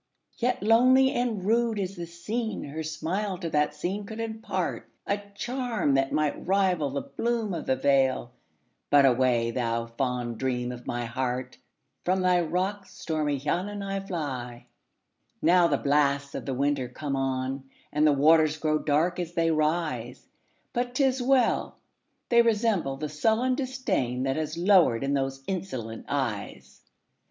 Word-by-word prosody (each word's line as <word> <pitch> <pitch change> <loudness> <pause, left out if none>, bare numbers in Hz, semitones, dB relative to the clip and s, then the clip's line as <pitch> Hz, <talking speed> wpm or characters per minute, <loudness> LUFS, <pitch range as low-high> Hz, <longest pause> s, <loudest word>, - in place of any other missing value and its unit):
Yet 245 -3 0
lonely 255 +4 +5
and 235 -6 -1
rude 230 +1 +2
as 195 -1 -3
the 170 -1 -6
scene, 210 +6 -4
Her 150 +3 -5
smile 175 +6 -2
to 170 -3 -5
that 150 0 +1
scene 185 +7 -3
could 220 - -7
impartA 225 0 -3 0.5
charm 240 - -1
that 135 0 +2
might 150 +1 -1
rival 185 -6 +2
the 140 +1 -3
bloom 230 -4 -2
of 170 - -5
the 130 - +3
vale,—But 130 - 0
away, 125 -2 +3
thou 115 -1 -1
fond 120 -1 -3
dream 125 -2 -1
of 125 -1 -9
my 120 0 -2
heart! 125 +1 -3 0.4
From 185 +1 +1
thy 180 -1 +3
rocks, 185 +5 -3
stormy 150 -3 -1
Llannon, 190 +8 -2
I 195 0 -2
fly. 135 -11 -5 0.7
Now 175 +1 +5
the 145 -4 +1
blasts 140 -1 +1
of - - -6
the 135 - -1
winter 140 -1 0
come 140 +2 -4
on, 135 0 -2 0.2
And 150 +1 +4
the - - +6
waters 155 +2 +4
grow 155 0 +1
dark 160 +5 +1
as 175 -1 -4
they 165 -1 +2
rise! 155 -6 -1 0.5
But 245 0 -2
't 275 - +3
is 265 -1 +2
well!—they 245 -2 0
resemble 215 - +1
the 150 +2 -3
sullen 220 - +1
disdainThat 185 - -1
has 155 0 -3
lowered 175 - +4
in 140 +1 0
those 135 -1 -2
insolent 130 - -5
eyes. - - -4
155 Hz, 145 wpm, -27 LUFS, 135-200 Hz, 0.7 s, the